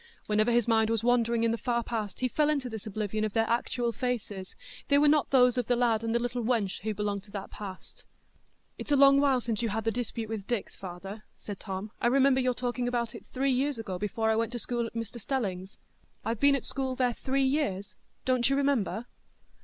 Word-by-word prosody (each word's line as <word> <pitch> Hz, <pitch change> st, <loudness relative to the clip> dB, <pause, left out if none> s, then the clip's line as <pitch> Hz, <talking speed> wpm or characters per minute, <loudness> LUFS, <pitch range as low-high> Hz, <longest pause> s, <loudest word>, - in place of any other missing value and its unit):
Whenever 215 Hz, +2 st, +2 dB
his 240 Hz, -1 st, +3 dB
mind 220 Hz, -1 st, +3 dB
was 225 Hz, -1 st, 0 dB
wandering 235 Hz, -1 st, +2 dB
in 230 Hz, -, +3 dB
the 230 Hz, -, -2 dB
far 240 Hz, -2 st, 0 dB
past, 220 Hz, -3 st, -4 dB
he 255 Hz, -, +3 dB
fell 300 Hz, +4 st, +1 dB
into 280 Hz, -4 st, 0 dB
this 220 Hz, -3 st, -7 dB
oblivion 215 Hz, 0 st, -2 dB
of 215 Hz, -2 st, -1 dB
their 225 Hz, 0 st, +2 dB
actual 235 Hz, 0 st, 0 dB
faces; 210 Hz, -5 st, -4 dB, 0.3 s
they 280 Hz, -, +4 dB
were 295 Hz, +1 st, +5 dB
not 300 Hz, 0 st, +4 dB
those 250 Hz, -2 st, +5 dB
of 245 Hz, -, -2 dB
the 245 Hz, -, +3 dB
lad 235 Hz, -2 st, +2 dB
and 225 Hz, 0 st, 0 dB
the -, -, +5 dB
little 245 Hz, +1 st, -2 dB
wench 220 Hz, -5 st, 0 dB
who 215 Hz, +2 st, -2 dB
belonged 205 Hz, -1 st, -2 dB
to 205 Hz, -, -20 dB
that 200 Hz, -1 st, -6 dB
past. 195 Hz, -3 st, -9 dB, 0.7 s
"It's -, -, -6 dB
a -, -, +6 dB
long 275 Hz, 0 st, +7 dB
while 270 Hz, -3 st, +3 dB
since 225 Hz, -2 st, -2 dB
you 230 Hz, -, 0 dB
had 220 Hz, +2 st, -2 dB
the 225 Hz, -, +1 dB
dispute 230 Hz, -1 st, -3 dB
with 215 Hz, -3 st, -5 dB
Dix, 240 Hz, -4 st, -2 dB
father," 195 Hz, +3 st, -8 dB, 0.2 s
said 205 Hz, -3 st, -7 dB
Tom. 195 Hz, +1 st, -5 dB
"I -, -, +3 dB
remember 265 Hz, +1 st, +4 dB
your 250 Hz, -1 st, +1 dB
talking 245 Hz, 0 st, -2 dB
about 235 Hz, -2 st, -1 dB
it -, -, -11 dB
three 270 Hz, +1 st, 0 dB
years 270 Hz, +1 st, +1 dB
ago, 195 Hz, -5 st, -4 dB
before 220 Hz, +2 st, 0 dB
I -, -, +2 dB
went 230 Hz, +1 st, 0 dB
to -, -, -2 dB
school 240 Hz, 0 st, -2 dB
at 230 Hz, -, -12 dB
Mr 230 Hz, +1 st, -5 dB
Stelling's. 195 Hz, -7 st, -3 dB, 0.5 s
I've 225 Hz, -1 st, -1 dB
been 280 Hz, 0 st, +5 dB
at 270 Hz, -, -3 dB
school 265 Hz, -1 st, -2 dB
there 250 Hz, -1 st, +1 dB
three 270 Hz, +3 st, 0 dB
years; 210 Hz, -9 st, -1 dB, 0.3 s
don't 255 Hz, -1 st, +2 dB
you 275 Hz, -, +2 dB
remember?" 270 Hz, -5 st, +1 dB
235 Hz, 230 wpm, -29 LUFS, 215-255 Hz, 0.7 s, long